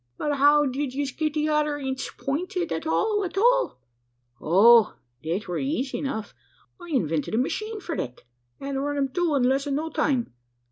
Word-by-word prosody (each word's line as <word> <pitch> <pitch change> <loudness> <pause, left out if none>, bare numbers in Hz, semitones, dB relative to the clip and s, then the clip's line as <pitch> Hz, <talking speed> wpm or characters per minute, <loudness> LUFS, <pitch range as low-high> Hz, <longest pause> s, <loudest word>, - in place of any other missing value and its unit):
"But 290 -1 -1
how 290 +2 +5
did 265 0 -3
yez 280 -1 -2
get 310 +2 -2
the 305 0 +1
other 300 -1 +1
inds 265 -2 -4
pointed 355 +6 -2
at 160 - -3
all 410 - +1
at 370 0 -5
all?" - - +3 0.6
"Oh! 215 +7 +6 0.3
thet 170 +6 -3
weer 180 - -2
eezy 270 -1 -2
enough. 220 -7 -4 0.5
I 345 - -10
invented 165 - -1
a - - +1
machine 430 - -2
for 350 -4 -5
thet, 125 0 -5 0.4
an' 275 0 -3
run 290 +1 -2
'em 275 -1 0
through 335 +1 0
in 265 - +2
less'n 275 +2 +1
no 320 +2 -3
time. 265 - 0
280 Hz, 180 wpm, -25 LUFS, 250-310 Hz, 0.6 s, Oh